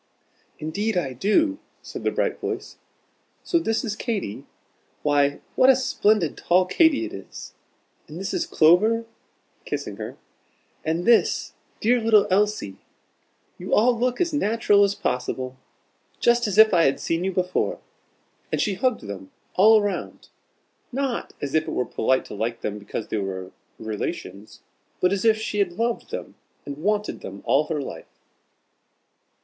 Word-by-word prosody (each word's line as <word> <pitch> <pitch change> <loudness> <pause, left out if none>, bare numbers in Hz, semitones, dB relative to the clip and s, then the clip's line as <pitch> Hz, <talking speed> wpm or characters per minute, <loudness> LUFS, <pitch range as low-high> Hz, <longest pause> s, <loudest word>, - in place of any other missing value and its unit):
"Indeed 200 +7 -2
I 135 -7 -1
do," 290 - +2 0.2
said - - -8
the - - +2
bright - - -1
voice. - - -5 0.7
"So 340 - +2
this 225 -4 -1
is 215 -2 -2
Katy? 215 - -4 0.6
Why, 145 -1 +2
what 255 - +5
a 265 - +8
splendid 215 - +1
tall 180 +1 +3
Katy 320 - +3
it 335 - -8
is! - - -9 0.5
And 155 +3 -8
this 195 - -3
is - - -1
Clover," 215 +9 +4 0.6
kissing - - -4
her; - - -7 0.7
"and 165 +2 -1
this 235 -1 +3 0.3
dear 240 +2 +3
little 220 -2 +5
Elsie. 200 - +1 0.8
You 180 - 0
all 240 +3 +4
look 245 +1 0
as 340 -3 0
natural 215 -6 +3
as 200 0 +1
possible 130 +1 -3 0.6
just 240 -1 +3
as 200 - -2
if 220 -1 +8
I 170 -2 +5
had 135 - +2
seen 165 +1 -1
you 190 - 0
before." 180 0 -1 0.7
And - - 0
she 205 - +1
hugged 250 +4 0
them 100 -2 -8 0.2
all 215 +2 +6
round, 205 - -4 0.6
not 265 -1 -2
as 140 - -3
if 155 0 +2
it - - -3
was 125 - -2
polite 130 +3 +1
to - - -9
like 115 +3 -3
them 105 0 -3
because 105 +1 -6
they - - -1
were 95 -2 -4 0.3
relations, 105 -2 -6 0.4
but 180 +1 +3
as 200 +2 -2
if 220 -1 +5
she 215 -1 -3
had 185 -4 +1
loved 230 +5 -2
them - - -6 0.3
and 140 0 -6
wanted 210 +4 -1
them 100 +1 -9
all 145 +3 +3
her 155 -2 -2
life. - - -8
195 Hz, 155 wpm, -24 LUFS, 145-225 Hz, 0.8 s, a